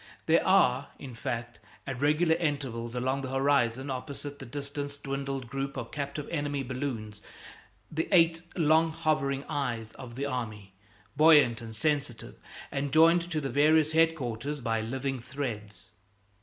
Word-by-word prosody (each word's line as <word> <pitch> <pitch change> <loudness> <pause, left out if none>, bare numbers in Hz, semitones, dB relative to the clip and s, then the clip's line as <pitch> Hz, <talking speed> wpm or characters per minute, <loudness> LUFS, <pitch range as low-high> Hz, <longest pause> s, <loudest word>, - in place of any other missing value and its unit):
There 165 +1 +4
are, 140 -8 +4
in 130 -3 -9
fact, 115 +1 -4 0.3
at 135 -2 -5
regular 155 +3 +3
intervals 135 -8 -2
along 130 +2 0
the 130 - -5
horizon, 135 -1 +1
opposite 140 +2 -5
the 135 - -8
distance 145 +2 -5
dwindled 135 -2 -4
group 135 +2 -4
of 120 -2 -5
captive 145 0 -4
enemy 145 -3 -1
balloons, 120 -5 -4 0.7
the 160 +1 -1
eight 165 -3 +5 0.2
long 160 0 +4
hovering 150 -4 0
eyes 120 -7 -2
of 120 -2 -10
the 140 +2 -2
army, 110 -7 -5 0.4
buoyant 145 -6 +6
and 115 -1 -8
sensitive, 140 -2 -2 0.3
and 140 0 -2
joined 165 +3 +5
to 160 -3 -1
the 135 -3 -3
various 155 +3 +4
headquarters 150 -4 +1
by 115 -3 -1
living 130 +3 -3
threads. 105 -7 -6
140 Hz, 145 wpm, -29 LUFS, 120-150 Hz, 0.7 s, buoyant